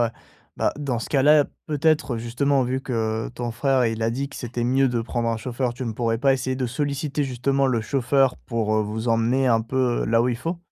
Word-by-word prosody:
ouais, -, -, +4 dB
ouais. -, -, -5 dB, 0.5 s
Bah, -, -, +1 dB
dans 135 Hz, -5 st, -2 dB
ce -, -, -6 dB
cas-là, 145 Hz, +1 st, +5 dB, 0.2 s
peut-être, 155 Hz, -3 st, +1 dB
justement, 130 Hz, +4 st, +1 dB
vu 130 Hz, +1 st, -1 dB
que, 110 Hz, -4 st, -2 dB
heu, -, -, -8 dB
ton 120 Hz, 0 st, -4 dB
frère, 130 Hz, +1 st, +1 dB
il 115 Hz, 0 st, -2 dB
a 115 Hz, -, +1 dB
dit 135 Hz, +4 st, -3 dB
que -, -, -11 dB
c'était 120 Hz, -1 st, -4 dB
mieux 135 Hz, +2 st, +3 dB
de 120 Hz, -1 st, -1 dB
prendre 115 Hz, 0 st, -2 dB
un 115 Hz, -, 0 dB
chauffeur, 120 Hz, +2 st, -3 dB
tu 130 Hz, +1 st, -5 dB
ne 115 Hz, -, -2 dB
pourrais 115 Hz, 0 st, -1 dB
pas 135 Hz, +2 st, +4 dB
essayer 130 Hz, 0 st, -1 dB
de 130 Hz, -, -1 dB
solliciter 145 Hz, +3 st, -2 dB
justement 135 Hz, +1 st, 0 dB
le 125 Hz, -3 st, +1 dB
chauffeur 135 Hz, +2 st, +1 dB
pour, 110 Hz, -2 st, 0 dB
heu, 110 Hz, -, +2 dB
vous 110 Hz, +3 st, -3 dB
emmener 115 Hz, +4 st, +2 dB
un 115 Hz, -2 st, +4 dB
peu, 125 Hz, +1 st, 0 dB
heu, -, -, -1 dB
là 115 Hz, +1 st, +3 dB
où 125 Hz, -, +1 dB
il 120 Hz, -, -1 dB
faut? 165 Hz, +8 st, -4 dB
125 Hz, 245 wpm, -23 LUFS, 115-135 Hz, 0.5 s, cas-là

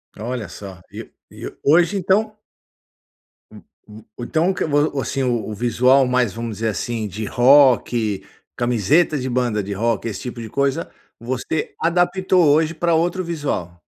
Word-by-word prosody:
Olha 115 Hz, -1 st, -5 dB
só. 95 Hz, -3 st, -10 dB
E -, -, -9 dB, 0.2 s
e -, -, -9 dB
hoje 170 Hz, +7 st, +3 dB
então 210 Hz, +4 st, 0 dB, 1.1 s
U -, -, -14 dB, 0.5 s
u 120 Hz, -, -6 dB
então 160 Hz, +8 st, +1 dB
o -, -, +1 dB
que -, -, -2 dB
vo 145 Hz, 0 st, +1 dB
o -, -, -1 dB
seu 120 Hz, -5 st, -2 dB
visual 125 Hz, +4 st, +3 dB
mais, 125 Hz, -5 st, +1 dB
vamos 115 Hz, -2 st, -5 dB
dizer 115 Hz, 0 st, -2 dB
assim, 110 Hz, +1 st, -3 dB
de 105 Hz, +3 st, -6 dB
rock, 120 Hz, -5 st, +3 dB, 0.3 s
camiseta 125 Hz, -, +2 dB
de 130 Hz, 0 st, -3 dB
banda 120 Hz, -4 st, 0 dB
de 100 Hz, -, -7 dB
rock, 115 Hz, +2 st, -1 dB
esse 100 Hz, -, -6 dB
tipo 120 Hz, -2 st, -7 dB
de 110 Hz, -, -7 dB
coisa, 140 Hz, +5 st, -1 dB, 0.3 s
você 130 Hz, +6 st, -3 dB
adaptou 180 Hz, +1 st, +2 dB
hoje 155 Hz, +3 st, +3 dB
pra 170 Hz, +1 st, 0 dB
outro 175 Hz, +3 st, 0 dB
visual. 140 Hz, -, -4 dB
125 Hz, 155 wpm, -20 LUFS, 115-160 Hz, 1.1 s, hoje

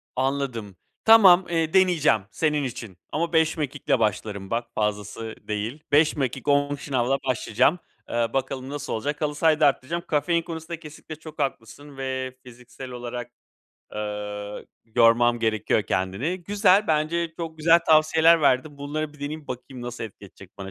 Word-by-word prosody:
Anladım. 130 Hz, -6 st, -2 dB, 0.3 s
Tamam. 190 Hz, -5 st, +8 dB
Iıı, 165 Hz, -2 st, 0 dB
deneyeceğim 175 Hz, -, +4 dB
senin 150 Hz, -2 st, 0 dB
için 115 Hz, -7 st, -6 dB
ama 165 Hz, +2 st, -2 dB
5 160 Hz, 0 st, +3 dB
mekikle 145 Hz, -4 st, -1 dB
başlarım 105 Hz, -2 st, -2 dB
bak 120 Hz, +1 st, -1 dB
fazlası 105 Hz, +1 st, -3 dB
değil. 110 Hz, +8 st, -4 dB
5 150 Hz, +2 st, +4 dB
mekik 135 Hz, -1 st, -3 dB
10 145 Hz, 0 st, +2 dB
şınavla 135 Hz, -2 st, 0 dB
başlayacağım. 130 Hz, +6 st, +2 dB, 0.3 s
Eee, 120 Hz, 0 st, +1 dB
bakalım 135 Hz, 0 st, -2 dB
nasıl 145 Hz, 0 st, -5 dB
olacak? 145 Hz, +7 st, -3 dB
Halı 150 Hz, -1 st, -1 dB
sahayı 155 Hz, 0 st, +3 dB
da 150 Hz, -, +6 dB
arttıracağım. 145 Hz, +5 st, -1 dB
Kafein 170 Hz, +3 st, +1 dB
konusunda 165 Hz, 0 st, -7 dB
kesinlikle 155 Hz, 0 st, -10 dB
çok 155 Hz, 0 st, -12 dB
haklısın 135 Hz, +1 st, -5 dB
ve 130 Hz, -1 st, -4 dB
fiziksel 125 Hz, +1 st, -11 dB
olarak, 120 Hz, 0 st, -6 dB, 0.6 s
ııı, 105 Hz, -1 st, -5 dB, 0.3 s
yormam 120 Hz, 0 st, +4 dB
gerekiyor 110 Hz, -1 st, +1 dB
kendimi. 105 Hz, -, -2 dB
Güzel. 205 Hz, 0 st, +3 dB
Bence 160 Hz, +2 st, 0 dB
çok 160 Hz, -2 st, -6 dB
güzel 165 Hz, +2 st, +6 dB
tavsiyeler 160 Hz, +1 st, +5 dB
verdin. 140 Hz, +1 st, +1 dB
Bunları 150 Hz, +1 st, -4 dB
bir 150 Hz, -, -18 dB
deneyeyim. 150 Hz, +1 st, -5 dB
Bakayım 125 Hz, 0 st, -7 dB
nasıl 120 Hz, -1 st, -5 dB
etkileyecek 100 Hz, -2 st, -11 dB
edecek 95 Hz, +1 st, -16 dB
bana? 95 Hz, 0 st, -7 dB
140 Hz, 150 wpm, -24 LUFS, 115-155 Hz, 0.6 s, Tamam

